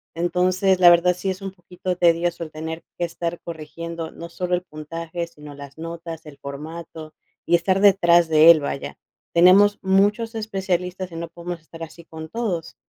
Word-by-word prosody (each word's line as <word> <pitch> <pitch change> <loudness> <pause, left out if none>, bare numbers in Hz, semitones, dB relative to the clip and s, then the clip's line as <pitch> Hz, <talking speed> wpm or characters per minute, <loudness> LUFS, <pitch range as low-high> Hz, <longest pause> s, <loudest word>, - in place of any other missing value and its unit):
Entonces, 185 +2 +1
la 175 -1 +9
verdad 175 +1 +5
sí 190 - -3
es 190 +1 -4
un 195 - -4
poquito 180 0 -5
tedioso 170 0 +2
el 155 - -8
tener 160 +1 -6 0.2
que 175 - 0
estar 170 0 -4
corrigiendo 165 0 -7
no 170 - -9
solo 180 +1 -1
el 180 - -4
puntaje, 165 +1 -6
sino 150 -3 -12
las 140 +1 -11
notas, 165 0 -7
el 150 -2 -12
formato, 155 +2 -8 0.3
y 170 - -1
estar 185 +3 +1
detrás 175 -4 +5
de 160 +1 +6
él, 165 -2 +8
vaya. 140 -1 -5 0.3
Tenemos 195 +4 +6
muchos 205 +4 +2
especialistas 185 -4 -3
y - - -9
no 170 0 -4
podemos 170 0 -7
estar 165 +1 -11
así 170 +1 -11
con 160 -1 -10
todos. 195 -6 -3
170 Hz, 175 wpm, -22 LUFS, 160-185 Hz, 0.3 s, la